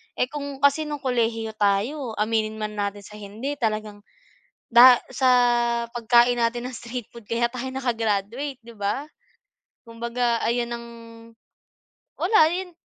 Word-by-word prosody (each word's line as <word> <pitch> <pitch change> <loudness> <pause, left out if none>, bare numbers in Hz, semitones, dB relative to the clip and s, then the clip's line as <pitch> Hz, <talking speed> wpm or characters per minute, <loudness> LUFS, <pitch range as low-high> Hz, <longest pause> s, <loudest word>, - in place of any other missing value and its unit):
Eh, 250 - -1
kung 285 -2 -6
kasi 290 +2 +3
no'ng 295 -2 -5
kolehiyo 225 -3 0
tayo 220 +5 0
aminin 215 0 0
man 215 -1 -4
natin 200 0 -3
sa 210 +2 -12
hindi 225 +8 -6
talagang, 215 -2 -2 0.7
da 245 +1 +8
sa 260 0 +1 0.6
pagkain 240 +1 +3
natin 240 +1 -1
ng 255 - -9
street 240 -1 -7
food 235 -2 -13
kaya 235 +2 0
tayo 250 +1 -6
naka-graduate, 240 +1 -2
'di 235 0 -13
ba? 205 +9 -2 0.8
Kumbaga 235 +1 -1
ayan 235 +1 0
ang, 235 0 -7 1.3
wala 415 +5 +3
'yan 365 0 -4
235 Hz, 135 wpm, -24 LUFS, 220-260 Hz, 1.3 s, da